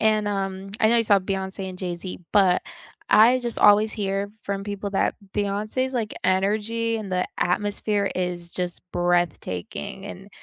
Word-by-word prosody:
And, 215 -1 +3
um, 195 -1 -3
I 220 - +5
know 235 - +4
you 230 - +4
saw 205 -1 +5
Beyoncé 190 0 -4
and 185 -1 -8
Jay-Z, 180 0 -5
but 190 -3 +4 0.5
I 235 +4 +6
just 240 -2 -4
always 210 +1 +6
hear 200 -1 -2
from 195 0 -3
people 205 0 -4
that 195 - +1 0.2
Beyoncé's, 210 +6 -1
like, 225 -3 -2
energy 215 +4 +1
and 205 -3 -6
the 180 0 +1
atmosphere 205 +2 0
is 175 -1 -3
just 180 -1 -4
breathtaking, 175 - -1
and 195 0 -9
200 Hz, 155 wpm, -24 LUFS, 185-215 Hz, 0.5 s, I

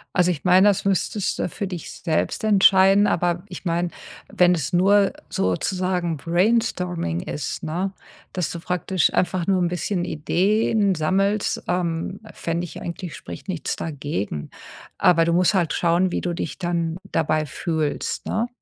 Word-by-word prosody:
Also 180 -1 +4
ich 160 - -5
meine, 185 +2 +6
das 200 -2 +2
müsstest 200 +1 0
du - - 0
für 200 +3 -4
dich 180 -4 -6
selbst 160 +4 -2
entscheiden, 195 -1 +5
aber 175 -1 0
ich 180 - -9
meine, 175 -1 0 0.4
wenn 180 0 +4
es 160 -1 -2
nur 195 +2 +4 0.2
sozusagen 185 -3 -1
Brainstorming 175 - 0
ist, 145 +7 -5
ne? 180 +5 -2 0.4
Dass 180 -3 -1
du 170 - -5
praktisch 180 0 0
einfach 180 -1 0
nur 190 -2 +2
'n 175 - +1
bisschen 175 +1 -2
Ideen 200 +5 +1
sammelst, 195 +6 0
ähm, 175 +1 -1
fände 170 +1 -3
ich 175 - -9
eigentlich 170 -2 -6
spricht - - -9
nichts 170 -6 -3
dagegen. 140 - -4 0.5
Aber 165 -2 +4
du 170 - +1
musst 180 +3 +3
halt 175 -5 +1
schauen, 175 +2 +2
wie - - -1
du 175 - -2
dich 170 - -4
dann 170 -2 -1
dabei 155 -1 +1
fühlst, 155 -1 -2
ne? 230 +3 -1
180 Hz, 155 wpm, -23 LUFS, 165-190 Hz, 0.5 s, meine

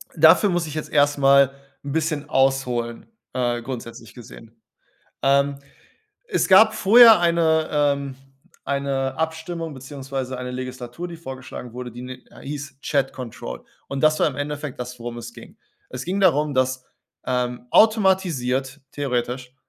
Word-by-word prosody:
Dafür 165 +6 +6
muss 175 -2 -1
ich 150 - -7
jetzt 155 - -4
erst 145 0 +3
mal 140 -1 +5 0.3
'n 140 - -5
bisschen 155 -1 -2
ausholen, 125 -4 0 0.3
äh, 120 -2 -1
grundsätzlich 115 -2 -8
gesehen. 115 -1 -14 0.6
Ähm, 140 +1 +2 0.7
es 435 - 0
gab 220 +3 +7
vorher 225 +1 +7
eine 165 -2 +2
ähm, 140 -2 0 0.5
eine 135 -1 -2
Abstimmung 160 0 -3
beziehungsweise 135 -1 -6
eine 125 0 -5
Legislatur, 130 +5 -6
die 170 - -8
vorgeschlagen 130 -5 -9
wurde, 125 0 -7
die 120 +1 -9
ni 130 - -7 0.2
äh, - - -15
hieß 145 -1 -7
„Chat 140 -2 0
Control.“ 125 -3 -8 0.2
Und 140 - -4
das 155 0 +3
war - - +4
im 135 - -7
Endeffekt 145 -1 -5
das, 125 0 -6
worum 120 0 -6
es 120 0 -8
ging. - - -14 0.3
Es 130 0 -6
ging 190 +3 -2
darum, 150 -6 +3
dass, 130 0 0 0.4
ähm, 125 -1 -2
automatisiert- 165 - +2
theoretisch- 125 -2 -3
140 Hz, 145 wpm, -22 LUFS, 125-160 Hz, 0.7 s, gab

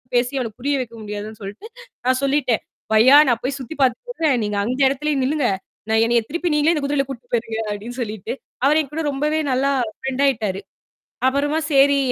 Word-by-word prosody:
பேசிப் 250 +3 +1
அவனுக்கு 230 -1 -5
புரிய 285 +2 +1
வைக்க 230 -2 -5
முடியாதுன்னு 210 +1 -6
சொல்ட்டு, 200 - -8 0.4
நான் 255 0 +2
சொல்லிட்டேன் 275 -4 +1 0.3
"பையா! 255 +6 +7
நான் 235 -2 +1
போய் 275 +2 -2
சுத்தி 265 +5 -7
பாத்துட்டு 260 - +1
வரேன். 275 -5 +3
நீங்க 210 -1 -2
அந்த 250 +5 -2
இடத்திலேயே 285 +2 0
நில்லுங்க. 285 -1 +1 0.4
நான் 220 0 +3
என்னையத் 235 -1 +1
திருப்பி 340 +1 -1
நீங்களே 300 +2 +3
இந்தக் 295 -3 -1
குதிரையில 280 -1 +1
கூட்டிட்டு 245 -2 -9
போயிருங்க 225 -1 -1
அப்பிடீன்னு 225 +5 -6
சொல்லிட்டு. 215 -4 -4 0.3
அவர் 305 +3 +5
என்கூட 300 +3 -5
ரொம்பவே 300 +3 0
நல்லா 270 +2 +2 0.3
ஃப்ரெண்ட் 265 +1 -2
ஆயிட்டாரு. 215 -7 -1 0.7
அப்புறமா 290 +3 +1
சரி" 280 0 +5
260 Hz, 180 wpm, -21 LUFS, 230-285 Hz, 0.7 s, பையா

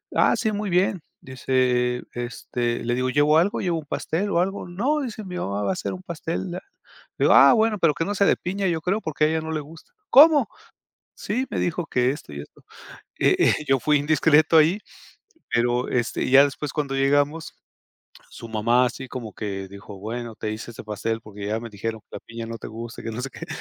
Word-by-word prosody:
"Ah, - - +4
sí, 220 -3 0
muy 205 0 -3
bien", 180 0 +1 0.2
dice, 125 -1 0
este, 120 0 -3
le 120 +1 0
digo: 130 +1 0
"¿Llevo 145 +3 +4
algo? 180 +5 +2
¿Llevo 175 -3 0
un 155 - -11
pastel 175 +7 -2
o 170 - +2
algo?". 195 +3 -1
"No", 250 +13 0
dice, 230 -5 -5
"mi 180 -1 -7
mamá 100 - -3
va - - 0
a - - +1
hacer 185 - -4
un 185 0 -9
pastel". 170 +1 -4
La 180 - -4 0.6
Le - - +2
digo: - - +6
"Ah, - - +8
bueno, 220 -2 +2
pero 165 -4 +3
que 165 - -2
no 205 - -2
sea 200 - +3
de - - +3
piña, 195 +2 -3
yo 170 -2 0
creo, 195 +6 -1
porque 155 -3 0
a - - +4
ella 160 +1 0
no 160 0 -5
le 155 - -1
gusta". 160 +3 -14 0.2
"¿Cómo?". 290 -3 +7 0.7
"Sí, 250 +6 -2
me - - -2
dijo 175 0 -1
que 125 -4 +1
esto 145 - -10
y 70 - -6
esto". 75 - -15 0.6
Eh, - - +4
eh, - - +5
yo 135 0 +3
fui 150 +4 +3
indiscreto 155 +2 +4
ahí. 160 +6 +4 0.7
Pero 120 +1 +1
este 120 -2 -1
ya 135 +1 +8
después, 145 0 -4
cuando 140 -3 -2
llegamos, 145 +3 +1 0.8
su 115 - -10
mamá 115 +3 +2
así 130 +2 -6
como 120 -4 -7
que 95 -3 -5
dijo: 100 0 -11
"Bueno, 115 +3 -5
te 105 - -4
hice 110 +2 -7
este 115 - -10
pastel 110 +2 -3
porque 105 -2 -8
ya 110 +2 -1
me 115 0 -8
dijeron 110 +2 -5
que - - -62
la - - -8
piña 115 0 -8
no 115 0 -6
te - - -8
gusta", 115 +1 -8
y - - -15
que 115 - -3
no 120 +3 -5
sé 135 - -4
qué. - - -9
140 Hz, 225 wpm, -24 LUFS, 115-175 Hz, 0.8 s, Ah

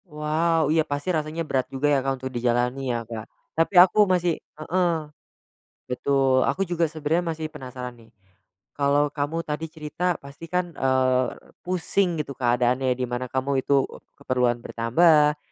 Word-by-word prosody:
Wow. 155 0 +1
Iya 160 - +4
pasti 145 +5 -2
rasanya 155 +1 -2
berat 130 -4 -1
juga 135 +2 -1
ya 140 - +4
Kak, 135 +1 0
untuk 130 - -4
dijalani 125 +2 0
ya 120 -1 -1
Kak. 110 -1 -7 0.3
Tapi, 165 +4 0
aku 190 +4 +7
masih 175 -2 +1
heeh, 175 +3 -1 0.9
betul. 130 0 +2
Aku 165 +9 0
juga 170 -1 0
sebenernya 160 +2 -1
masih 160 -1 -4
penasaran 130 -4 -8
nih. 115 -1 -19 0.6
Kalau 145 +1 +2
kamu 155 +3 -2
tadi 150 +2 -3
cerita, 160 +2 -2
pastikan, 165 +5 -4
eee, 130 -1 +2 0.4
pusing 180 0 0
gitu 140 -2 -7
keadaannya, 125 +1 +1
di 130 - -1
mana 125 +1 -3
kamu 135 +1 0
itu 140 -1 +3 0.3
keperluan 125 -2 +1
bertambah, 150 +5 +4
145 Hz, 145 wpm, -24 LUFS, 130-165 Hz, 0.9 s, aku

